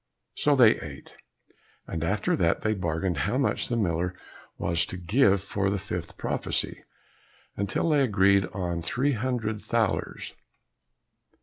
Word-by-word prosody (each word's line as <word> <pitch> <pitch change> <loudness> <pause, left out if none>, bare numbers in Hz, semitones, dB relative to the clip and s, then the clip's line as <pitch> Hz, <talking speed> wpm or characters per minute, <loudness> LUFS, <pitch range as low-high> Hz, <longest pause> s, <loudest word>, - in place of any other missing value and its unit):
So 145 -1 +3
they 120 -5 +6
ate, 70 -3 -10 0.7
and 80 -1 -4
after 100 +5 +1
that 85 -3 +1
they 110 - +2
bargained 90 -1 -1
how 105 +7 0
much 135 - 0
the 120 - 0
miller 90 -3 0 0.4
was 85 0 +2
to 95 - -6
give 100 +1 +3
for 95 0 -1
the 100 - 0
fifth 90 -3 -6
prophesy, - - -2 0.7
until 100 - -1
they 150 -2 +4
agreed 100 -5 +4
on 90 -4 -3
three 130 - 0
hundred 115 -3 -2
thalers. 115 -3 -1
100 Hz, 135 wpm, -27 LUFS, 90-115 Hz, 0.7 s, they